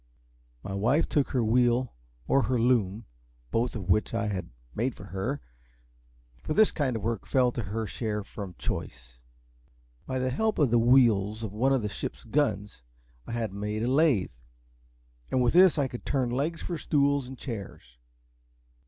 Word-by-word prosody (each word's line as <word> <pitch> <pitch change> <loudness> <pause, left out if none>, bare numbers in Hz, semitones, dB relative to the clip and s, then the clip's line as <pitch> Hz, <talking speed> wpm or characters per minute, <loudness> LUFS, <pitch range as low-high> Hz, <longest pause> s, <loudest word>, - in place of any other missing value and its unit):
My 95 - -5
wife 120 +11 +2
took 145 -3 +1
her 125 -4 +1
wheel 120 +2 +2 0.3
or 135 - +4
her 125 -2 0
loom, 115 -3 +1 0.5
both 120 +2 0
of 100 -5 -5
which 105 +3 +1
I 115 -2 0
had 95 -3 -4 0.2
made 120 +2 -1
for 105 - -11
her, 100 +8 -3 1.0
for 155 - -3
this 215 +3 +5
kind 135 -6 -1
of 110 - -4
work 115 -2 -2
fell 125 -2 +3
to 120 - -3
her 110 +2 -3
share 105 +1 -3
from 100 -3 -8
choice. - - -6 0.9
By 130 - -2
the 130 0 0
help 220 - 0
of 140 -6 +3
the 120 - +5
wheels 115 -3 +4
of 105 -3 -5
one 125 +6 +2
of 135 -4 +2
the - - 0
ship's 100 - -6
guns 105 - -1 0.5
I - - -5
had 115 -4 -2
made 105 +2 -3
a - - 0
lathe, 135 - +3 1.0
and 130 - +1
with 120 - +2
this 180 -1 +6
I 140 -2 +2
could 120 -1 -8
turn 130 -4 0
legs 150 +7 -2
for 170 -3 -4
stools 140 -2 +1
and 130 0 -9
chairs. 100 - -8
120 Hz, 175 wpm, -28 LUFS, 105-135 Hz, 1.0 s, this